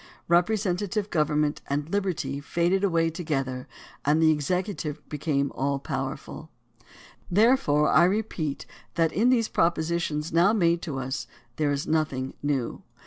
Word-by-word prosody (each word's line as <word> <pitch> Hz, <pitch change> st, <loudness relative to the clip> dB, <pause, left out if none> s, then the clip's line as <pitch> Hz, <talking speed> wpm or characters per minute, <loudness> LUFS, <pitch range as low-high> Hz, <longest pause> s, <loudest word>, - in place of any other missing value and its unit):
Representative 200 Hz, +2 st, +1 dB
government 150 Hz, -1 st, +1 dB
and 145 Hz, +3 st, -2 dB
Hb 205 Hz, -, +2 dB
erty 145 Hz, -7 st, -3 dB
faded 175 Hz, +6 st, +1 dB
away 165 Hz, -4 st, +2 dB
together 135 Hz, -6 st, -3 dB, 0.4 s
and 150 Hz, +2 st, +3 dB
the 160 Hz, -1 st, +5 dB
executive 155 Hz, 0 st, -2 dB
became 140 Hz, -2 st, -1 dB
all 140 Hz, +1 st, 0 dB
powerful. 135 Hz, +3 st, -5 dB, 0.8 s
Therefore 180 Hz, -, +4 dB
I 170 Hz, -, +5 dB
repeat 185 Hz, -7 st, -2 dB, 0.3 s
that 165 Hz, -2 st, +2 dB
in 230 Hz, +5 st, +3 dB
these 235 Hz, -3 st, +3 dB
proposi 170 Hz, 0 st, +1 dB
tions 150 Hz, -1 st, -3 dB
now 175 Hz, +5 st, +5 dB
made 170 Hz, -5 st, +2 dB
to 155 Hz, -7 st, -4 dB
us 130 Hz, 0 st, -3 dB, 0.3 s
there 150 Hz, -2 st, +1 dB
is 140 Hz, 0 st, -1 dB
nothing 150 Hz, -5 st, -1 dB
new. 140 Hz, -5 st, -1 dB
160 Hz, 140 wpm, -26 LUFS, 145-180 Hz, 0.8 s, the